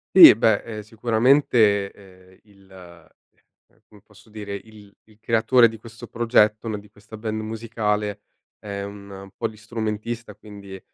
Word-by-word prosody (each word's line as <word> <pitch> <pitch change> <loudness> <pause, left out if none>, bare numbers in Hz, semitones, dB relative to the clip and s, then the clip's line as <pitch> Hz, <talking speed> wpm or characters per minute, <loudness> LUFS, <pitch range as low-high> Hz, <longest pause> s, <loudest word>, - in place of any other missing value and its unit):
Sì, - - +11
beh, 110 -1 +2
ehm, 110 -2 -7
sicuramente, 110 -2 +2
ehm, 95 -1 -19
il, 100 -2 -23
ehm, 90 -2 -20
come 105 -2 -20
posso 105 +1 -21
dire? 105 -2 -8
Il 105 0 -12
il 110 -1 -23
creatore 115 +2 +4
di 115 -1 -9
questo 115 +2 -12
progetto, 115 -2 +1
no, 110 -2 -3
di 105 +1 -13
questa 105 +1 -13
band 110 0 -4
musicale 105 -2 -3 0.4
è 100 -1 -6
un 100 -1 -10
polistrumentista 110 0 -5
quindi 100 -2 -12
105 Hz, 135 wpm, -23 LUFS, 100-115 Hz, 0.4 s, Sì